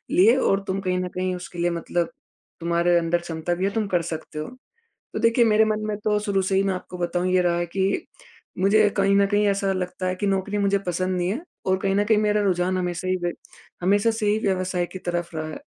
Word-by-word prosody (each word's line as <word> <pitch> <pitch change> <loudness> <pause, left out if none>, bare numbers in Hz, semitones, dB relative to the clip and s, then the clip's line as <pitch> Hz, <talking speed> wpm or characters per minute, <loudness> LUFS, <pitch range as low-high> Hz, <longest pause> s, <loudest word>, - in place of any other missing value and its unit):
लिए 220 +7 +6
और 195 -6 +2
तुम 190 +1 -1
कहीं 185 -1 0
न 180 - -2
कहीं 185 0 -1
उसके 180 0 -8
लिए 175 0 +1
मतलब 170 0 -1 0.5
तुम्हारे 170 +1 +2
अंदर 170 +1 0
क्षमता 165 0 -3
भी 185 +2 -1
है 200 - 0
तुम 220 -2 0
कर 180 -3 +1
सकते 155 -1 -6
हो। 155 - -4 0.7
तो - - -2
देखिए 230 +1 +4
मेरे 220 0 +4
मन 215 0 -1
में 210 -1 -2
तो 210 -1 +3
शुरू 200 -2 0
से 190 +1 0
ही 195 - +3
मैं 195 -1 +1
आपको 180 0 -8
बताऊँ 175 +1 -1
ये 185 0 +4
रहा 175 -1 +2
है 175 - 0
कि 190 +3 -1 0.5
मुझे 205 +2 +4
कहीं 200 0 +3
न 200 - +5
कहीं 205 +1 +2
ऐसा 195 -1 +1
लगता 185 0 -3
है 185 - -1
कि 200 +2 -2
नौकरी 195 +1 0
मुझे 200 0 +2
पसंद 185 +1 -1
नहीं 175 0 0
है 225 +10 -2 0.3
और 190 - +3
कहीं 195 0 0
न 205 - +3
कहीं 215 0 +3
मेरा 210 0 +2
रुझान 185 -1 +1
हमेशा 180 0 -2
ही 185 0 +1 0.6
हमेशा 200 +5 +3
से 220 -1 -3
ही 210 +1 +3
व्यवसाय 185 -3 0
की 185 - -6
तरफ 175 -1 -3
रहा 155 0 -3
है। 155 - -7
185 Hz, 240 wpm, -24 LUFS, 175-205 Hz, 0.7 s, लिए